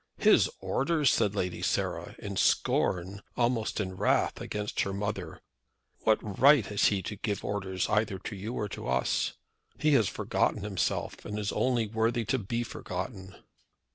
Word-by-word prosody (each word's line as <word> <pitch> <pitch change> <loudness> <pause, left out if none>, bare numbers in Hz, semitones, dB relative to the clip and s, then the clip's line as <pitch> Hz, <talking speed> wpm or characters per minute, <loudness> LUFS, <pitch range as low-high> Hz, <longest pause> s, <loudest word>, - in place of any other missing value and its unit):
"His - - +5
orders!" 150 -2 +2
said 105 0 +1
Lady 90 -3 -2
Sarah, - - -1
in - - -6
scorn, 95 +2 +1 0.2
almost 120 -3 +1
in 95 -2 -3
wrath 100 +2 +1
against 105 0 -4
her 100 - -1
mother. 105 +1 -4 0.6
"What 105 -2 0
right 140 -3 +7
has 105 -1 +1
he 100 -2 0
to 105 - -4
give 105 0 -3
orders 95 -2 -2
either 105 -2 +1
to 100 - -6
you 105 +5 -5
or 105 - -1 0.2
us? 65 - +1 0.4
He 155 - +2
has 110 -8 +4
forgotten - - 0
himself, 100 -3 -2
and 105 - -5
is 105 -1 -1
only 125 -3 +1
worthy 115 +2 0
to 130 +5 +1
be 115 +3 -2
forgotten." 95 -2 -6
105 Hz, 155 wpm, -29 LUFS, 95-115 Hz, 0.6 s, right